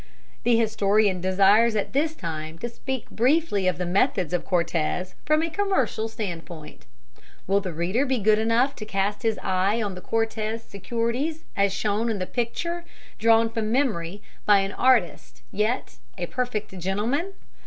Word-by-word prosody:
The 235 Hz, -1 st, +3 dB
historian 210 Hz, -3 st, +2 dB
desires 200 Hz, +5 st, +4 dB
at 210 Hz, -, -1 dB
this 305 Hz, +3 st, +1 dB
time 160 Hz, -, -5 dB
to 240 Hz, -, -4 dB
speak 260 Hz, +1 st, -5 dB
briefly 250 Hz, -, +2 dB
of 185 Hz, -, +1 dB
the 180 Hz, -, -2 dB
methods 185 Hz, -, +1 dB
of 180 Hz, -, 0 dB
Cortez 170 Hz, 0 st, 0 dB
from 305 Hz, +1 st, +3 dB
a 330 Hz, -, -1 dB
commercial 315 Hz, -, 0 dB
stand 195 Hz, -7 st, -5 dB
point. 160 Hz, -3 st, -11 dB, 0.6 s
Will 195 Hz, +2 st, +3 dB
the 185 Hz, -2 st, -4 dB
reader 175 Hz, -, 0 dB
be 265 Hz, -2 st, 0 dB
good 215 Hz, 0 st, +3 dB
enough 230 Hz, +5 st, +2 dB
to 215 Hz, -, -6 dB
cast 200 Hz, 0 st, -1 dB
his 225 Hz, -3 st, 0 dB
eye 190 Hz, +4 st, +1 dB
on 205 Hz, -4 st, -2 dB
the 180 Hz, -, -8 dB
Cortez 225 Hz, +1 st, -2 dB
securities 235 Hz, -, -2 dB
as 200 Hz, 0 st, +2 dB
shown 210 Hz, +3 st, 0 dB
in 220 Hz, -, -1 dB
the 185 Hz, -, -2 dB
picture 340 Hz, -, -3 dB, 0.4 s
drawn 225 Hz, 0 st, +5 dB
from 225 Hz, -1 st, -2 dB
memory 205 Hz, -8 st, -1 dB, 0.2 s
by 205 Hz, -1 st, +5 dB
an 195 Hz, 0 st, -2 dB
artist 245 Hz, -6 st, +1 dB
yet 215 Hz, +5 st, -1 dB, 0.2 s
a -, -, -2 dB
perfect 215 Hz, -6 st, -3 dB
gentleman? 225 Hz, -, -1 dB
215 Hz, 165 wpm, -25 LUFS, 190-240 Hz, 0.6 s, drawn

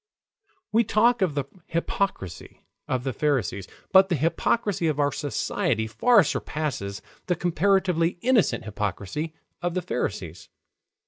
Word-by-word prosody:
We 230 Hz, +2 st, +4 dB
talk 235 Hz, +2 st, +3 dB
of 175 Hz, -6 st, +1 dB
the 140 Hz, -2 st, -1 dB, 0.2 s
hypocrisy 170 Hz, -, -3 dB, 0.2 s
of 130 Hz, -1 st, -1 dB
the 135 Hz, -1 st, -2 dB
Pharisees. 120 Hz, -, 0 dB, 0.2 s
But 190 Hz, 0 st, +7 dB
the 175 Hz, -, +2 dB
hypocrisy 170 Hz, -, +1 dB
of 150 Hz, -2 st, 0 dB
our 145 Hz, 0 st, +3 dB
society 135 Hz, -5 st, -1 dB
far 205 Hz, -, +4 dB
surpasses 140 Hz, -11 st, -3 dB, 0.2 s
the 180 Hz, -, +2 dB
comparatively 180 Hz, 0 st, +1 dB
innocent 240 Hz, -, +2 dB
hypocrisy 105 Hz, -, -3 dB, 0.3 s
of 175 Hz, 0 st, -2 dB
the 185 Hz, -, -1 dB
Pharisees. 95 Hz, -, -4 dB
160 Hz, 125 wpm, -25 LUFS, 125-190 Hz, 0.3 s, But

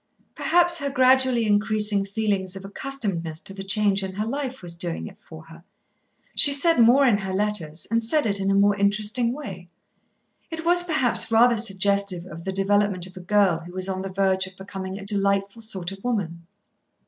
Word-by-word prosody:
Perhaps 345 Hz, 0 st, +2 dB
her 280 Hz, -1 st, -2 dB
gradually 260 Hz, -2 st, +3 dB
increasing 210 Hz, -1 st, +2 dB
feeling 200 Hz, 0 st, -1 dB
of 195 Hz, -, -9 dB
accustomedness 195 Hz, -9 st, -4 dB
to 195 Hz, -, -3 dB
the 195 Hz, -, -8 dB
change 200 Hz, 0 st, +1 dB
in 190 Hz, -1 st, -5 dB
her 210 Hz, +3 st, -3 dB
life 265 Hz, -1 st, -5 dB
was 175 Hz, -1 st, -3 dB
doing 170 Hz, 0 st, -5 dB
it -, -, -11 dB
for 160 Hz, -1 st, -13 dB
her. 165 Hz, +1 st, -15 dB, 0.7 s
She 285 Hz, -, +4 dB
said 330 Hz, +1 st, +3 dB
more 245 Hz, +4 st, +5 dB
in 220 Hz, -6 st, +3 dB
her 190 Hz, -1 st, -5 dB
letters, 190 Hz, -6 st, -1 dB
and 230 Hz, 0 st, +1 dB
said 295 Hz, +7 st, +1 dB
it 200 Hz, -2 st, +2 dB
in 195 Hz, 0 st, -1 dB
a 195 Hz, -, +2 dB
more 200 Hz, +1 st, +3 dB
interesting 210 Hz, +4 st, +1 dB
way. 190 Hz, -11 st, -8 dB, 0.8 s
It 325 Hz, -1 st, -6 dB
was 350 Hz, +1 st, +5 dB
perhaps 270 Hz, -9 st, 0 dB
rather 235 Hz, +2 st, +4 dB
suggestive 200 Hz, -3 st, 0 dB
of 165 Hz, -2 st, -11 dB
the 190 Hz, -, -2 dB
development 195 Hz, -1 st, 0 dB
of 185 Hz, +1 st, -13 dB
a -, -, -9 dB
girl 190 Hz, -2 st, +1 dB
who 175 Hz, +2 st, -12 dB
was 185 Hz, 0 st, -3 dB
on 190 Hz, -1 st, -3 dB
the 195 Hz, -, -5 dB
verge 190 Hz, 0 st, +1 dB
of 190 Hz, -1 st, -14 dB
becoming 190 Hz, 0 st, -7 dB
a 200 Hz, -, -9 dB
delightful 200 Hz, +1 st, 0 dB
sort 190 Hz, -5 st, -4 dB
of 195 Hz, 0 st, -11 dB
woman. 170 Hz, -9 st, -3 dB
200 Hz, 195 wpm, -23 LUFS, 190-235 Hz, 0.8 s, more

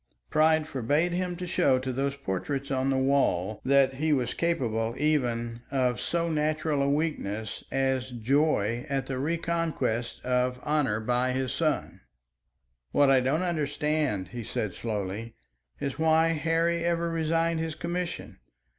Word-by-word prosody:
Pride 155 Hz, 0 st, +4 dB
forbade 145 Hz, +5 st, 0 dB
him 180 Hz, 0 st, -1 dB
to 180 Hz, +1 st, -5 dB
show 140 Hz, -7 st, +3 dB
to 130 Hz, 0 st, -3 dB
those 140 Hz, +2 st, -1 dB
portraits 135 Hz, +4 st, -3 dB
on 130 Hz, 0 st, +1 dB
the 135 Hz, -, +2 dB
walls 120 Hz, -8 st, +1 dB
that 135 Hz, 0 st, +4 dB
he 155 Hz, +4 st, 0 dB
was 125 Hz, -4 st, +1 dB
capable 115 Hz, -9 st, 0 dB
even 120 Hz, -6 st, 0 dB
of 125 Hz, -3 st, 0 dB
so 170 Hz, 0 st, 0 dB
natural 155 Hz, -1 st, 0 dB
a 140 Hz, -, +2 dB
weakness 125 Hz, -9 st, -2 dB
as 130 Hz, -1 st, 0 dB
joy 120 Hz, -2 st, +1 dB
at 135 Hz, -2 st, -1 dB
the 135 Hz, -1 st, -3 dB
reconquest 160 Hz, -6 st, -1 dB
of 125 Hz, 0 st, +1 dB
honour 145 Hz, -8 st, +1 dB
by 125 Hz, +3 st, 0 dB
his 130 Hz, -3 st, -1 dB
son. -, -, -1 dB, 0.9 s
"What 145 Hz, -1 st, +4 dB
I 135 Hz, -, +6 dB
don't 140 Hz, +7 st, +1 dB
understand," 150 Hz, -, -1 dB
he 120 Hz, -1 st, -6 dB
said 105 Hz, -2 st, -3 dB
slowly, 110 Hz, +1 st, -4 dB, 0.4 s
"is 140 Hz, +1 st, -3 dB
why 160 Hz, +1 st, +4 dB
Harry 165 Hz, +1 st, +1 dB
ever 170 Hz, 0 st, 0 dB
resigned 165 Hz, 0 st, +1 dB
his 160 Hz, -1 st, -3 dB
commission. 170 Hz, -, -4 dB
140 Hz, 145 wpm, -28 LUFS, 125-160 Hz, 0.9 s, I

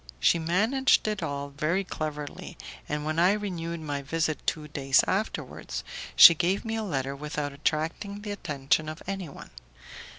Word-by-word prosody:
She 170 Hz, -, +4 dB
managed 215 Hz, +12 st, +2 dB
it 210 Hz, -2 st, -1 dB
all 140 Hz, 0 st, -3 dB
very 155 Hz, +7 st, 0 dB
cleverly, 150 Hz, -5 st, -6 dB, 0.3 s
and, 150 Hz, 0 st, -2 dB
when 155 Hz, +1 st, -1 dB
I 180 Hz, +3 st, +5 dB
renewed 170 Hz, -5 st, -4 dB
my 145 Hz, -2 st, -3 dB
visit 155 Hz, +2 st, -1 dB
two 155 Hz, -2 st, -1 dB
days 135 Hz, -2 st, +3 dB
afterwards, 205 Hz, +3 st, -3 dB, 0.3 s
she 170 Hz, -, +11 dB
gave 180 Hz, +6 st, 0 dB
me 225 Hz, 0 st, -2 dB
a 225 Hz, -, -1 dB
letter 140 Hz, -9 st, -2 dB
without 150 Hz, 0 st, -4 dB
attracting 160 Hz, +8 st, -2 dB
the 205 Hz, 0 st, -5 dB
attention 150 Hz, -5 st, 0 dB
of 155 Hz, -, -8 dB
anyone. 190 Hz, -6 st, -6 dB
160 Hz, 155 wpm, -27 LUFS, 145-195 Hz, 0.3 s, she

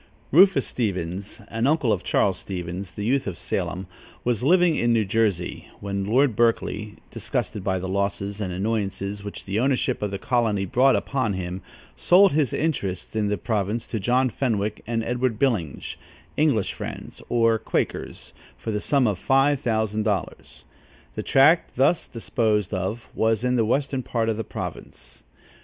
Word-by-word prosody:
Rufus 180 Hz, -2 st, +6 dB
Stevens, 95 Hz, -1 st, -3 dB
an 115 Hz, +3 st, 0 dB
uncle 140 Hz, -7 st, +2 dB
of 95 Hz, -, -3 dB
Charles 95 Hz, -3 st, +1 dB
Stevens, 90 Hz, 0 st, -5 dB
the 100 Hz, +4 st, -6 dB
youth 130 Hz, +2 st, +1 dB
of 90 Hz, -4 st, -4 dB
Salem, 95 Hz, +5 st, -3 dB, 0.4 s
was 120 Hz, -3 st, 0 dB
living 175 Hz, +3 st, +4 dB
in 120 Hz, -3 st, +1 dB
New 115 Hz, -2 st, +3 dB
Jersey, 100 Hz, -4 st, -1 dB
when 100 Hz, -1 st, -3 dB
Lord 125 Hz, +3 st, +3 dB
Berkeley, 110 Hz, -2 st, 0 dB, 0.2 s
disgusted 100 Hz, -, -3 dB
by 95 Hz, -1 st, 0 dB
the 95 Hz, +1 st, -4 dB
losses 100 Hz, +1 st, -2 dB
and 95 Hz, -3 st, -2 dB
annoyances 100 Hz, 0 st, -2 dB
which 100 Hz, -, -7 dB
the 100 Hz, +2 st, -1 dB
ownership 130 Hz, 0 st, +1 dB
of 105 Hz, -, -1 dB
the 100 Hz, -, -4 dB
colony 110 Hz, -3 st, 0 dB
brought 130 Hz, +8 st, +4 dB
upon 130 Hz, -7 st, -1 dB
him, 90 Hz, 0 st, -4 dB, 0.3 s
sold 190 Hz, +2 st, +5 dB
his 145 Hz, -4 st, +1 dB
interests 110 Hz, -, -2 dB
in 105 Hz, -1 st, +1 dB
the 105 Hz, 0 st, 0 dB
province 110 Hz, +1 st, -1 dB
to 110 Hz, -, -3 dB
John 125 Hz, +5 st, +2 dB
Fenwick 105 Hz, -5 st, -1 dB
and 115 Hz, -1 st, -1 dB
Edward 125 Hz, -1 st, -1 dB
Byllinge, 105 Hz, -, -1 dB, 0.4 s
English 140 Hz, -10 st, +2 dB
Friends, -, -, -7 dB
or 115 Hz, -1 st, +3 dB
Quakers, -, -, -3 dB, 0.2 s
for 110 Hz, -, -4 dB
the 105 Hz, -1 st, -2 dB
sum 140 Hz, +3 st, +2 dB
of 105 Hz, -5 st, 0 dB
five 135 Hz, +1 st, +3 dB
thousand 110 Hz, -4 st, 0 dB
dollars. 100 Hz, -4 st, -3 dB, 0.5 s
The -, -, -4 dB
tract 150 Hz, +6 st, +4 dB
thus 140 Hz, +6 st, +2 dB
disposed 110 Hz, -4 st, -1 dB
of 95 Hz, +5 st, -3 dB
was 110 Hz, +1 st, +1 dB
in 125 Hz, 0 st, +2 dB
the 115 Hz, -2 st, +2 dB
western 135 Hz, +3 st, 0 dB
part 115 Hz, -2 st, -1 dB
of 110 Hz, -, -1 dB
the 115 Hz, -, -2 dB
province. -, -, -8 dB
110 Hz, 165 wpm, -24 LUFS, 100-125 Hz, 0.5 s, Rufus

